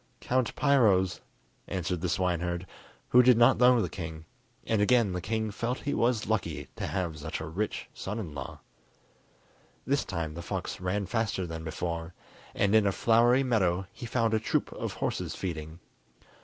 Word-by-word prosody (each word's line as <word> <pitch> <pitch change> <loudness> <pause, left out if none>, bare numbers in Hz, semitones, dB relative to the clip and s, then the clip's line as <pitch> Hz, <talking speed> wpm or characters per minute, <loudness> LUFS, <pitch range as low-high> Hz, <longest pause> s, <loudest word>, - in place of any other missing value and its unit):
"Count 130 -2 0
Piro's," 105 -10 +3 0.5
answered 90 -2 -2
the 90 - -1
swineherd, 90 0 -1 0.4
who 125 - +7
did 125 -1 +6
not 120 +3 +6
know 125 0 +6
the - - -1
king; 80 -3 -7 0.4
and 110 -2 +1
again 115 -1 +4
the 90 - -3
king 110 +3 -2
felt 120 +4 -3
he 145 - -2
was 115 -2 +1
lucky 110 -2 -2
to - - -3
have 85 -5 -3
such 75 +2 -4
a 80 - -5
rich 95 +7 -3
son 105 +3 -5
in 90 -9 -5
law. 70 - -7 1.2
This 140 +1 +1
time 85 -4 -4
the 85 - -6
fox 85 - -4
ran 95 +2 -1
faster 105 -1 -1
than 80 -1 -6
before, 85 +1 -4 0.4
and 100 +1 +2
in 110 -2 +5
a - - +3
flowery 120 +5 +4
meadow 95 -7 +1
he 120 - -7
found 115 -1 +1
a 110 - +3
troop 110 - -1
of - - -4
horses - - -3
feeding. 80 -3 -5
100 Hz, 170 wpm, -29 LUFS, 85-115 Hz, 1.2 s, who